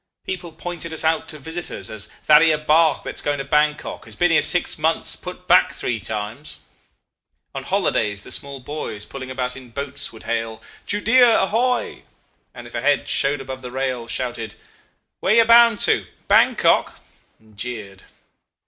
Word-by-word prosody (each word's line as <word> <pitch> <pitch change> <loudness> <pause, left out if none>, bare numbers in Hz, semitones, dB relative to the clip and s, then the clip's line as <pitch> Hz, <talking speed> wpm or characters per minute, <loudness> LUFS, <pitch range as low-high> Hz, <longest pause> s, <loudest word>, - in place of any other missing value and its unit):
People 180 -3 -5
pointed 170 -1 -6
us 160 - -1
out 160 0 +1
to 155 - -6
visitors 160 - -6
as 110 0 -4 0.2
'That 150 0 +7
'ere 160 -2 +4
bark 155 +2 +3
that's - - -5
going 145 0 -1
to 135 - -5
Bankok 150 +1 0
has - - -10
been 175 0 +2
here 160 - +4
six 180 -3 +3
months 160 +1 0
put 180 0 -9
back 180 +1 +5
three 115 -2 -3
times.' 110 +8 -5 1.0
On - - -5
holidays 105 -2 0
the - - -8
small 140 -1 -2
boys 125 -6 -5
pulling 130 -1 -8
about 125 -1 -3
in 130 -2 -12
boats 140 +3 -5
would 110 - -13
hail, 115 -1 -3 0.3
'Judea, 225 +3 +4
ahoy!' 245 +5 0 0.5
and - - -11
if - - -13
a - - -3
head - - +1
showed 140 0 +1
above 130 0 -7
the 125 - -7
rail 130 -2 -3
shouted, 120 -3 -4 0.6
'Where 195 - +2
you 230 -1 +6
bound 235 -1 +6
to? - - +2 0.2
Bankok?' - - +3 0.4
and 110 -1 -24
jeered. 105 -4 -7
140 Hz, 165 wpm, -21 LUFS, 120-170 Hz, 1.0 s, That